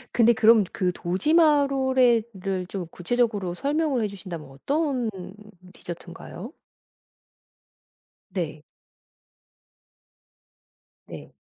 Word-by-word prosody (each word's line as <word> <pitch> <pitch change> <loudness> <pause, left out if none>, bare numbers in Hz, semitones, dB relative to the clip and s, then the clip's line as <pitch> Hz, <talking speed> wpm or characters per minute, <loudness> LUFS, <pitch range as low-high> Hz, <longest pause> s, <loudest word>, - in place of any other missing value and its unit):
근데 235 -1 +6
그럼 220 -1 +6
그 185 -3 0
도지마롤에 265 - +3
를 190 -1 -3
좀 185 -2 -5
구체적으로 205 -1 -1
설명을 285 - 0
해 - - +1
주신다면 185 -7 -8
어떤 265 - -1 0.6
디저트인가요? 175 - -9 1.8
네. 155 -5 -4 2.4
네. - - -10
220 Hz, 185 characters per minute, -25 LUFS, 180-265 Hz, 2.4 s, 근데